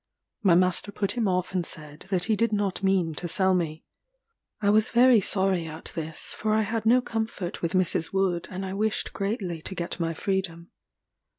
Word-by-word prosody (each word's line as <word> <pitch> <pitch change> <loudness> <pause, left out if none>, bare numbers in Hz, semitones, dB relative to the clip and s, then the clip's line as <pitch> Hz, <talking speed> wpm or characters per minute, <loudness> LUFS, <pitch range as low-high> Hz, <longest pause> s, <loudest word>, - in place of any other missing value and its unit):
My 190 -6 +5
master 185 +3 +2
put 200 -1 -1
him 225 -1 -1
off 180 0 -1
and 180 -2 0
said 150 +1 -8
that 185 -3 +1
he 220 - +2
did 230 +1 +1
not 200 -3 -1
mean 190 -4 +1
to 175 +3 -4
sell 190 +2 +2
me. 160 -3 -2 0.8
I 205 -1 +2
was 215 +1 +3
very 240 -2 +5
sorry 190 -3 +1
at 160 0 -8
this, 160 -1 -1
for 215 0 0
I 220 - +3
had 220 +1 -2
no 250 +2 +5
comfort 220 -6 -4
with 170 +1 -2
Mrs. 185 -3 +2
Wood, 190 -3 0
and 190 +1 -5
I 190 - -5
wished 215 +2 -1
greatly 195 -5 -3
to 190 - -6
get 170 0 -4
my 165 -1 -1
freedom. 175 -2 -3
190 Hz, 195 wpm, -26 LUFS, 170-210 Hz, 0.8 s, My